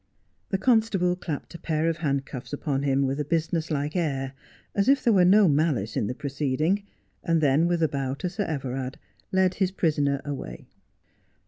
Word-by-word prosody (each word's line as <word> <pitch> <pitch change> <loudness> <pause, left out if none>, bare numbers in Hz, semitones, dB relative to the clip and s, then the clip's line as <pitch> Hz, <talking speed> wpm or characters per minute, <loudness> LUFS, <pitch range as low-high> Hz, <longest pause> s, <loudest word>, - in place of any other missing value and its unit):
The 190 - +1
constable 200 -5 +2
clapped 165 -4 -6
a 170 - -8
pair 160 -1 0
of 165 -1 0
handcuffs 140 -5 -3
upon 140 -2 -1
him 140 -1 +2
with 135 +2 -1
a - - +1
business 165 +1 -1
like 150 +1 -2
air, 135 -6 -1 0.4
as 200 +4 +2
if 275 -1 +4
there 235 - +4
were 185 -3 +5
no 200 +2 +6
malice 140 -9 +1
in 105 - 0
the 125 - -3
proceeding, 145 +7 0 0.4
and 165 -2 +2
then 150 +2 +3
with 175 -1 +1
a - - +4
bow 135 -2 -2
to 180 - -3
Sir 200 +3 -2
Everard 135 -4 -4 0.3
led 190 -1 +3
his 190 -1 +1
prisoner 145 -6 +1
away. 135 - -6
155 Hz, 185 wpm, -26 LUFS, 140-180 Hz, 0.4 s, no